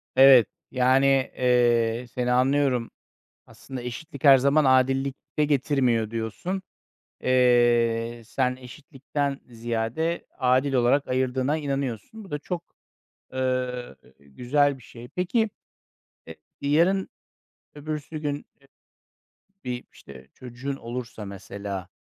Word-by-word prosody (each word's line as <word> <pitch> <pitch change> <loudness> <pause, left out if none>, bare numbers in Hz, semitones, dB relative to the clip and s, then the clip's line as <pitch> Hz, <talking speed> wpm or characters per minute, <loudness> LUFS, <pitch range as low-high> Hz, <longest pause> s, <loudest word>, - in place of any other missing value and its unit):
Evet, 130 -4 +8 0.2
yani, 130 +1 +3 0.3
eee, 120 -1 +2
seni 125 0 -2
anlıyorum. 130 -1 +2 0.6
Aslında 130 -2 -9
eşitlik 130 +4 -8
her 135 -1 +9
zaman 140 +4 +3
adillik 135 +1 +3 0.2
de 150 - +4
getirmiyor 130 -6 +1
diyorsun, 115 - -4 0.6
eee, 120 -2 +3
sen 125 +3 -1
eşitlikten 140 +2 -5
ziyade 120 +8 -2
adil 130 +1 +2
olarak 125 +3 +2
ayırdığına 130 +3 0
inanıyorsun. 140 - -4
Bu 190 - -14
da 150 - -2
çok, 175 +3 -5 0.7
ııı, 125 - -2 0.2
güzel 130 - 0
bir - - -17
şey. 120 +2 -12
Peki, 210 - 0 0.8
e 80 - -9 0.3
yarın 175 +6 +2 0.7
öbürsü 150 +1 -5
gün, 145 -2 -1 0.3
eee, 140 - -23 1.0
bir, 125 -1 -4
işte, 65 -1 -14
çocuğun 130 +3 -6
olursa, 120 -3 -7
mesela, 100 -1 -7
130 Hz, 105 wpm, -25 LUFS, 120-140 Hz, 1.0 s, her